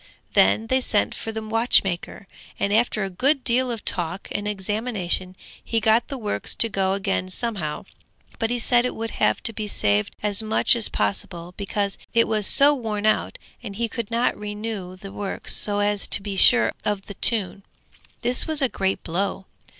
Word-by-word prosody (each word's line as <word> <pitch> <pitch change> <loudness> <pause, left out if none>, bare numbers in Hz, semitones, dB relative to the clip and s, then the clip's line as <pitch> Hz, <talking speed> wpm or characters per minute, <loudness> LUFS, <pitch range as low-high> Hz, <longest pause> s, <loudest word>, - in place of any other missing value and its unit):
Then 220 - +4
they 260 +3 +1
sent 210 -4 +2
for 225 - -6
the 220 0 -5
watchmaker, 215 -4 +1 0.3
and 200 - 0
after 220 -1 +1
a 195 - -3
good 270 +8 +1
deal 255 +1 +1
of 230 -3 -5
talk 175 +1 -3
and 205 0 -3
examination 200 -2 -3 0.3
he 230 - -1
got 220 +2 +2
the 275 - -5
works 210 -4 -2
to 230 - +4
go 195 -2 0
again 195 -2 -2
somehow; 185 -7 -2 0.5
but 225 - 0
he 245 - 0
said 240 +1 +3
it 250 - -2
would 225 0 -4
have - - +2
to 230 - +2
be 215 -1 -4
saved 105 - 0
as 205 0 +2
much 220 +2 +3
as 230 -2 +1
possible, 170 - -3
because 200 0 -3 0.2
it 230 - +4
was 215 -2 +1
so 285 +1 +5
worn 220 -6 -3
out, 215 - +1 0.2
and 200 - -8
he 230 +2 -1
could 230 -2 -5
not 235 +2 +1
renew 210 -3 -6
the 195 +1 -10
works 200 -1 -2
so 205 -1 0
as 205 0 +1
to 200 - +6
be 200 -1 -4
sure 245 +5 +5
of 205 -2 -2
the 200 - -8
tune. 200 -2 +1 0.6
This 250 +1 +4
was 315 -2 +2
a 265 - +3
great 195 -2 -2
blow! 190 +3 -3
210 Hz, 190 wpm, -23 LUFS, 195-230 Hz, 0.6 s, to